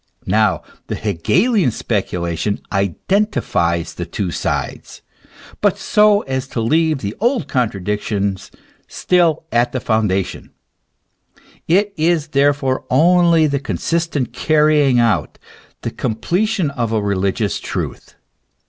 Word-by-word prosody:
Now - - +1 0.2
the - - -3
Hegelian 170 - +1
specula 90 -7 -2
tion 100 +5 -2
identifies 95 - 0
the 85 - -5
two 90 +1 -3
sides, - - -4 0.6
but - - +2
so 210 -1 +3
as 130 0 -3
to 125 - -4
leave 155 +5 +1
the 100 +1 -4
old 235 - +1
contra 120 -8 -1
diction 100 0 -1 0.5
still 170 -4 +1
at 120 +1 +1
the 130 - -1
foundation; 105 -5 -1 1.2
it 195 +4 +2
is 160 -1 +1
therefore 140 -2 +1
only 170 +3 +4
the 140 -2 0
con 140 - -4
sistent 165 -7 -1
carrying 150 -4 +3
out, 115 -2 +1 0.5
the - - -3
completion 175 - -1
of 120 -5 -2
a 110 - +1
religious 100 +1 -1
truth. - - -5
130 Hz, 120 wpm, -18 LUFS, 105-165 Hz, 1.2 s, only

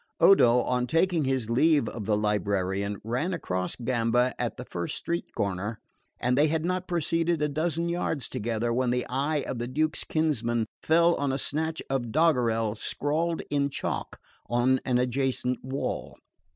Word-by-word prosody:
Odo, 125 -11 +6
on 125 0 0
taking 165 +1 +2
his 130 -4 0
leave 145 +1 +4
of 110 -4 -6
the 105 -1 +2
librarian, 100 -1 -1
ran 130 - -1
across 90 - -2
Gamba 120 0 +1
at 120 +1 -2
the 125 - -7
first 85 -6 -4
street 170 0 -3
corner; 100 +3 -2 0.4
and 125 0 +1
they 145 +3 +4
had 160 +1 0
not 185 +1 -1
proceeded 165 -1 0
a 150 - +1
dozen 160 +3 -1
yards 170 -5 -2
together 115 +1 -2
when 125 +1 +1
the 125 0 0
eye 140 +3 0
of 120 - -3
the 120 - -2
Duke's 155 +5 0
kinsman 120 -8 0 0.2
fell 170 +2 +4
on 140 -1 0
a 135 - 0
snatch 160 +4 -2
of 125 -4 -2
doggerel 120 -8 +2
scrawled 155 +9 -1
in 140 -1 +1
chalk - - -4 0.3
on 125 +2 +3
an 125 -1 +2
adjacent 125 0 0
wall. 135 +2 -4
130 Hz, 165 wpm, -27 LUFS, 115-155 Hz, 0.4 s, Odo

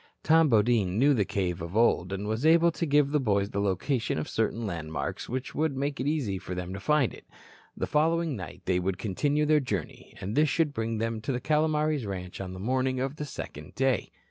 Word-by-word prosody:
Tom 160 -1 +5
Bodine 105 -4 +3
knew 140 +5 +5
the 105 -6 +2
cave 90 -3 -2
of 85 +5 -4
old 105 -6 +3
and 100 +1 -3
was 110 +4 -2
able 165 +2 +5
to 165 0 -3
give 145 -1 +3
the 150 - +3
boys 100 -5 +1
the 100 - -2
location 105 - 0
of 75 - -3
certain 115 +1 -1
landmarks 80 -5 -4
which 130 +1 -4
would 155 -3 0
make 140 +1 -2
it 130 - -1
easy 130 -11 -1
for 90 - -6
them 90 +1 -4
to 100 - -5
find 145 +4 +2
it. - - -14 0.5
The - - -1
following 165 0 +1
night 90 -8 -8
they 90 -1 +2
would 90 +1 -1
continue 140 +10 0
their 155 0 +4
journey, 105 - -5
and 95 +3 -4
this 150 0 +4
should 150 0 +1
bring 115 -1 -2
them 115 0 -2
to 110 - -2
the 125 - -1
Calomares 150 -3 +1
ranch 90 -1 -5
on 95 -1 -5
the 90 - -8
morning 130 +4 0
of 135 +3 -2
the 150 - -4
second 75 - -8
day. 135 -4 +1
120 Hz, 220 wpm, -28 LUFS, 95-150 Hz, 0.5 s, Tom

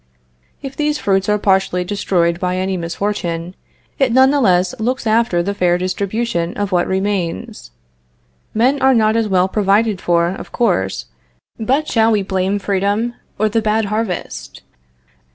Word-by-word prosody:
If 270 -1 -6
these 300 0 0
fruits 195 -3 0
are 210 - +3
partially 190 -3 +1
destroyed 175 -3 0
by 180 0 -1
any 190 +1 -1
misfortune, 175 -1 -3 0.5
it 270 -3 +3
none 260 +2 +5
the 285 -1 +1
less 185 -1 +3
looks 250 +3 -1
after 220 -5 +2
the 200 +3 -2
fair 175 -3 +2
distribution 185 0 -2
of 205 -1 -2
what 175 -1 +1
remains. 195 +2 -3 0.8
Men 260 +6 +1
are 265 0 +5
not 220 -1 +3
as 225 -1 +1
well 185 -2 +2
provided 205 0 +1
for, 170 0 +2
of 185 - -7
course, 140 - 0 0.5
but 270 +7 0
shall 225 -1 +3
we 210 -2 +1
blame 190 +1 -1
freedom 205 +4 -1 0.2
or 215 - +2
the 225 +2 0
bad 215 0 +1
harvest? 215 -5 -4
200 Hz, 155 wpm, -18 LUFS, 185-225 Hz, 0.8 s, none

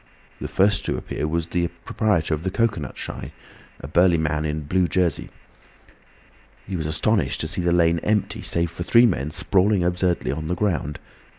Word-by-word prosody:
The - - -4
first 100 +2 +2
to - - -1
appear 75 - -4
was 85 +1 -1
the 85 -1 0 0.2
proprietor 95 -8 +1
of 75 - -2
the 95 - -2
cocoanut 100 - -1
shy, - - -6 0.5
a - - -7
burly 85 +3 +4
man 75 -1 -1
in 75 0 -1
a - - -4
blue 90 +5 +1
jersey. 85 -1 0 1.4
He 95 - -5
was 80 -3 -2
astonished 100 +8 0
to 80 - -2
see 85 - -2
the 85 0 +1
lane 85 -1 +3
empty 105 +3 -1
save 85 0 0
for 85 - -8
three 115 +7 +5
men 80 - 0
sprawling 95 +3 +2
absurdly 90 0 0
on 80 +2 -4
the 90 - -1
ground. 85 -6 -1
85 Hz, 185 wpm, -23 LUFS, 80-95 Hz, 1.4 s, three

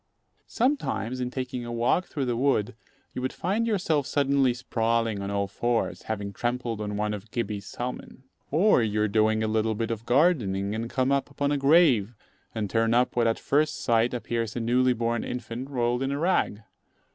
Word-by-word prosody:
Sometimes, 230 - -1
in 125 -1 -2
taking 130 -1 -4
a 120 - -6
walk 120 +10 +1
through 140 -3 -3
the 120 -1 -1
wood, 125 -3 +1 0.4
you - - -4
would 130 - -1
find 210 +6 -1
yourself 165 - 0
suddenly 140 -2 +2
sprawling 115 -3 -1
on 100 - -4
all 100 0 -1
fours, 120 +4 -1
having 100 -2 -3
trampled 120 0 -2
on 105 -1 -3
one 105 0 -1
of 105 +1 -7
Gibbey's 105 -3 -3
salmon. 125 +1 -6 0.3
Or 170 - +4
you 105 -1 0
are - - +2
doing 110 +1 +2
a - - 0
little 110 0 0
bit 115 +1 -2
of 115 +1 -5
gardening, 115 - +2
and 115 +1 -3
come 130 +1 0
upon 140 +1 0
a 145 - +1
grave, 135 - +4 0.4
and 110 -2 -1
turn 115 +2 +1
up 125 +1 +2
what 120 -1 +3
at 115 - +1
first 150 +2 +1
sight 115 +1 +2
appears 115 -1 -3
a - - -1
newly 125 +2 +2
born 115 0 -1
infant 125 +1 -5
rolled 120 -2 0
in 135 0 -1
a 140 - -1
rag. 150 - 0
120 Hz, 190 wpm, -26 LUFS, 110-135 Hz, 0.4 s, Or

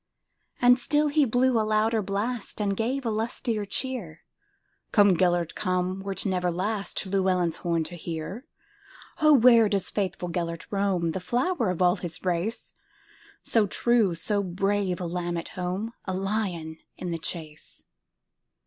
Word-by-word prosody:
And 245 +1 +6
still 295 +4 +2
he 290 0 +3
blew 245 0 +2
a - - +3
louder 215 +1 +2
blast, 205 +4 -3
And 200 -2 0
gave 250 +5 -1
a 225 - 0
lustier 220 0 -2
cheer:"Come, 200 - -1
Gêlert, 175 -2 +1
come, 185 -1 -1
wert 195 +1 -4
never 180 -2 0
lastLlewelyn's 190 -2 -1
horn 170 -2 0
to 160 +3 -8
hear."O, 305 - -4
where 235 -5 +7
doth 195 -2 -1
faithful 185 -3 -2
Gêlert 170 -1 -3
roam, 195 -4 +1
The 190 - -3
flower 245 - 0
of 180 0 0
all 180 0 +4
his 175 +1 -7
race, 180 +6 -2 0.7
So 220 -3 +2
true, 225 -3 +2
so 205 +5 +1
brave,—a 190 -1 -1
lamb 175 0 -2
at 165 - -5
home,A 185 +2 -4
lion 185 -5 -2 0.2
in 180 - -4
the 165 - -3
chase?" 155 -2 -6
195 Hz, 135 wpm, -26 LUFS, 175-225 Hz, 0.7 s, where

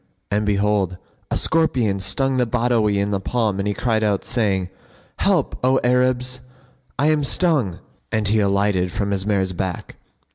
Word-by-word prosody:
And 105 +1 0
behold, 100 -2 +1 0.3
a - - 0
scorpion 125 -11 +1
stung 130 +8 0
the 125 -1 +2
Badawi 115 -3 +1
in 100 +1 0
the 100 - 0
palm 105 -1 -1
and 100 - -1
he 105 - -1
cried 110 -3 0
out, 105 -2 0
saying, 100 -6 0 0.5
"Help, - - +1
O 130 +1 +3
Arabs! 125 0 +1 0.6
I 145 +4 +3
am 150 -1 +1
stung;" 140 - +1 0.3
and 110 -2 0
he 110 +2 +2
alighted 100 -2 +1
from 100 +2 -2
his 100 0 -2
mare's 95 -3 +1
back. 90 -1 -5
105 Hz, 160 wpm, -21 LUFS, 100-125 Hz, 0.6 s, O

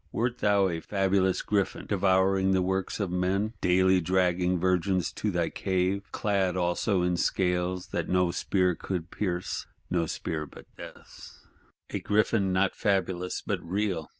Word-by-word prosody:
Wert 120 +1 -1
thou 100 -2 +3
a 85 -3 -2
fabulous 95 0 +1
Griffin, 100 -2 -1
devouring 95 -1 +2
the 95 -1 +2
works 95 +2 -2
of 100 -4 -2
men; 95 +4 0
daily 95 +1 +4
dragging 90 0 +1
virgins 90 -1 +1
to - - -2
thy - - -1
cave;—clad 95 0 -1
also 90 +2 +1
in 90 0 +1
scales 90 0 0
that - - -3
no 90 -1 +2
spear 90 0 +1
would 90 -3 -3
pierce: 90 -3 -3 0.2
no 85 -2 +1
spear 75 -1 -4
but - - -14
Death's? - - -12 0.5
A - - -2
Griffin 105 -2 +1
not 95 +1 +1
fabulous 95 -2 -1
but - - -2
real! 90 -2 -2
95 Hz, 145 wpm, -28 LUFS, 90-100 Hz, 0.5 s, daily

